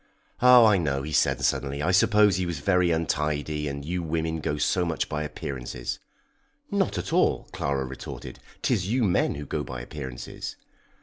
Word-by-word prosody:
Oh, 125 -1 +8
I 105 -3 +5
know," 70 -4 -1
he 75 - -5
said - - +2
suddenly, 70 +1 -1
"I 90 - +2
suppose 105 +1 +5
he 90 -1 -1
was 85 -2 -3
very 90 +3 +2
untidy, 75 -2 -1
and 70 0 -5
you 90 +3 -2
women 80 0 -2
go 75 0 -2
so 90 +4 +1
much 85 -2 -1
by 75 0 -3
appearances!" 65 -5 -5 0.7
"Not - - 0
at - - -4
all," - - +2
Clara 70 -1 -1
retorted. 65 0 -8 0.2
"'Tis 90 - +1
you 120 +4 +1
men 95 -5 +2
who 75 0 -6
go - - -2
by 65 - -6
appearances." 65 0 -7
75 Hz, 175 wpm, -26 LUFS, 70-90 Hz, 0.7 s, Oh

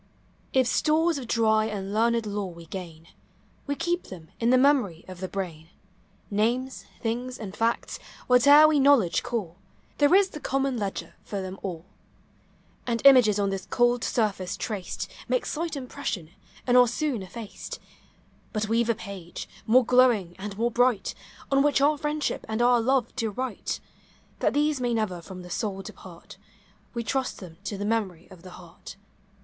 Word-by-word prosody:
If 260 -1 +3
stores 310 +4 +2
of 250 - -8
dry 220 -2 +3
and 200 -2 -4
learned 230 +1 +2
lore 205 -2 -3
we 170 0 -12
gain, 165 -2 -8 0.6
We 285 - -1
keep 345 +4 -1
them 170 -4 -11
in 230 - +2
the 255 - +6
memory 255 - +2
of 185 -1 -9
the 185 - -3
brain; 170 -5 -5 0.6
Names, 240 +6 0 0.2
things, 245 +2 -3
and 205 -3 -7
facts, 230 +1 -1
— - - -20
whate'er 285 +5 +7
we 305 -2 +3
knowl 275 -4 +6
edge 170 - -1
call,— 195 -8 -4 0.4
There 290 +4 +5
is 390 -1 +5
the 300 - -8
common 270 -1 -1
ledger 200 -4 -4
for 200 - -4
them 190 0 -6
all; 175 -3 -5 1.0
And 230 -1 0
images 250 -7 +7
on 200 -1 +1
this 195 -1 -5
cold 240 -1 +2
surface 200 -4 -1
traced 205 -5 -4 0.2
Make - - 0
slight 325 0 -3
impression, 250 - -5 0.3
and 245 - +2
are 250 0 +7
soon 255 -1 -1
effaced. 210 +3 -8 0.8
Rut 215 0 0
we 230 +2 +2
've 235 - -5
a 230 - +3
page, 195 -5 -8 0.2
more 245 +2 +5
glowing 240 -8 +3
and 200 0 -6
more 235 +2 +1
bright, 245 -3 +2 0.4
On 275 0 +4
which 285 -1 +3
our 290 +2 +4
friendship 300 0 -2
and 220 +1 -2
our 240 0 +4
love 255 0 +1
to 225 -3 0
write; 255 +5 -4 0.6
That - - +1
these 295 -2 +1
may 240 -1 0
never 195 -6 -2
from 180 +2 -9
the 180 - -11
soul 195 -3 -3
depart. 175 -2 -12 0.6
We 235 - -2
trust 265 +2 -2
them 170 -4 -11
to 200 - -3
the 205 - -3
memory 205 -6 -2
of 185 -3 -13
the 185 - -11
heart. 175 +1 -12
225 Hz, 175 wpm, -26 LUFS, 195-255 Hz, 1.0 s, whate'er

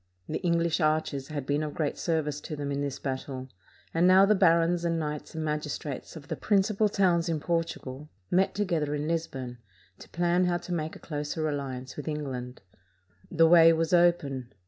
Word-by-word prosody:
The - - -3
English 170 -2 +1
archers 155 -3 0
had 145 -3 -5
been 145 +2 0
of 150 -1 -4
great 150 -3 -1
service 150 -3 -1
to 155 - -6
them 145 -1 -4
in 140 0 -1
this 140 -1 -3
battle, 130 -1 -5 0.4
and 170 +2 +3
now 190 +1 +7
the 210 - +4
barons 170 -2 +3
and 170 -1 0
knights 150 0 -4
and 160 -1 -3
magis 150 -1 -2
trates 140 +1 -7
of 145 -3 -10
the - - -3
principal 210 +1 +2
towns 180 -4 +2
in 160 -2 0
Portugal 150 -4 -3 0.2
met 190 +2 +2
together 165 -7 0
in 150 +1 -3
Lisbon 135 -7 -3 0.4
to - - -13
plan 175 +1 +1
how 175 -1 +1
to 175 +1 -6
make 160 -2 -3
a - - -11
closer 150 +1 -3
alliance 135 -3 -5
with 150 - -6
England. 130 -5 -4 0.7
The 165 - +4
way 165 0 +8
was 165 +1 0
open. 145 -8 +2
155 Hz, 190 wpm, -28 LUFS, 145-170 Hz, 0.7 s, way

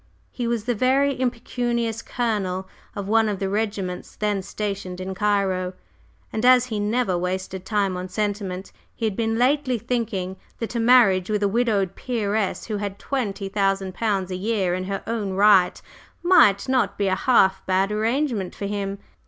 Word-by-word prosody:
He 240 -2 -3
was 235 -2 -1
the 245 +2 0
very 265 +5 +2
impecunious 235 -2 -1
colonel 195 -6 -2 0.3
of 200 -1 -4
one 225 +1 +3
of 205 - -2
the 195 - -2
regiments 200 -3 -3
then 210 -2 -1
stationed 195 -2 -4
in 185 +1 -4
Cairo, 190 -2 0 0.6
and 220 - -2
as 250 0 +6
he 220 -4 -3
never 210 -1 +1
wasted 185 +1 -3
time 200 -3 0
on 180 +1 -5
sentiment, 200 -2 -3 0.2
he 230 - -2
had 215 -3 -1
been 225 0 0
lately 255 0 +2
thinking 210 -5 -2 0.2
that 230 -1 -4
a 235 - -1
marriage 225 -6 +5
with 210 -1 0
a - - +4
widowed 205 -4 +1
peeress 215 -4 -1
who 215 -2 -3
had 200 -1 -4
twenty 215 -8 -3
thousand 195 -1 0
pounds 195 -3 -1
a - - -2
year 195 -2 0
in 185 +1 -2
her 195 0 -4
own 215 -4 -2
right 195 -2 +5 0.4
might 245 - +5
not 245 -7 +1
be 200 - 0
a 190 - +2
"half 190 -2 +3
bad" 190 +2 +2
arrangement 225 -2 -1
for 200 - -5
him. 200 -1 -3
205 Hz, 170 wpm, -23 LUFS, 190-230 Hz, 0.6 s, as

